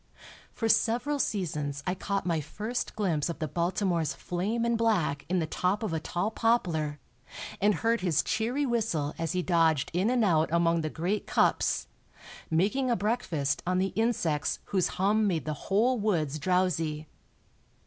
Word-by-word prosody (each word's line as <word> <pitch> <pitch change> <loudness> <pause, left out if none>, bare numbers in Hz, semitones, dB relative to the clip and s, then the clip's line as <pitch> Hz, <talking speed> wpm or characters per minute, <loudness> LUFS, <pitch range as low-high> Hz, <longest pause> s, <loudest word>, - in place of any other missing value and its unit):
For 225 - -2
several 245 +6 +2
seasons 150 - -2
I 180 - 0
caught 195 0 -2
my 165 -3 0
first 215 - -4
glimpse 175 -8 0
of 170 - -4
the 155 -1 -2
Baltimore's 175 +1 0
flame 210 +7 -2
and 235 0 +2
black 200 -11 0
in 185 - +1
the 165 - +1
top 185 +7 -1
of 210 - -2
a 160 - 0
tall 175 +6 -2
poplar, 170 -11 0 0.6
and 205 0 +4
heard 230 +1 +1
his 175 -5 +2
cheery 245 +6 0
whistle 210 - -1
as 165 -1 -1
he 180 0 0
dodged 165 -5 +2
in 185 +6 +2
and 245 -3 +2
out 160 -4 +3
among 170 0 +2
the 155 - -2
great 180 +7 -2
cups, - - +2 0.6
making 210 +11 +1
a 240 - +3
breakfast 175 - -1
on 180 0 +1
the 190 0 0
insects 200 -9 0
whose 190 -3 +1
hum 210 +3 +2
made 170 -5 -1
the 155 - -2 0.2
whole 235 +5 +3
woods 160 -8 0
drowsy. 165 -3 0
180 Hz, 165 wpm, -28 LUFS, 160-220 Hz, 0.6 s, and